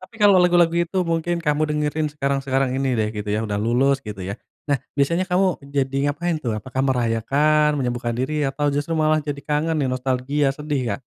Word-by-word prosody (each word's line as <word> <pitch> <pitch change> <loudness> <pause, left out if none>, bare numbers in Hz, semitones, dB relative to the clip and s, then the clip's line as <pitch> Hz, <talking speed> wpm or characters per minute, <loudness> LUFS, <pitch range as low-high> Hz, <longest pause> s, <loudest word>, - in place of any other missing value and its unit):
tapi 230 - -15
kalau 200 -2 +6
lagu-lagu 175 -2 +4
itu 170 +2 0
mungkin 165 +1 -1
kamu 150 +1 +1
dengerin 150 +1 -1
sekarang-sekarang 135 -2 0
ini 135 -3 0
deh 110 -1 +1
gitu 105 -1 -5
ya, 105 +1 0
udah 105 -2 -2
lulus, 130 +5 +2
gitu 105 -3 -8
ya. 95 - -3 0.4
Nah, 140 - +3 0.2
biasanya 170 +6 +2
kamu 180 +2 +3 0.3
jadi 135 0 0
ngapain 165 +3 -1
tuh? 120 -5 -2
Apakah 130 +4 -4
merayakan, 140 +5 +2
menyembuhkan 120 -1 -2
diri, 145 +3 -1
atau 145 +2 -1
justru 145 +3 -2
malah 155 0 +2
jadi 145 -1 -5
kangen 155 +2 0
nih, 135 - 0
nostalgia, 130 +3 0
sedih, 145 -5 -2
Kak? - - -17
140 Hz, 190 wpm, -22 LUFS, 130-155 Hz, 0.4 s, kalau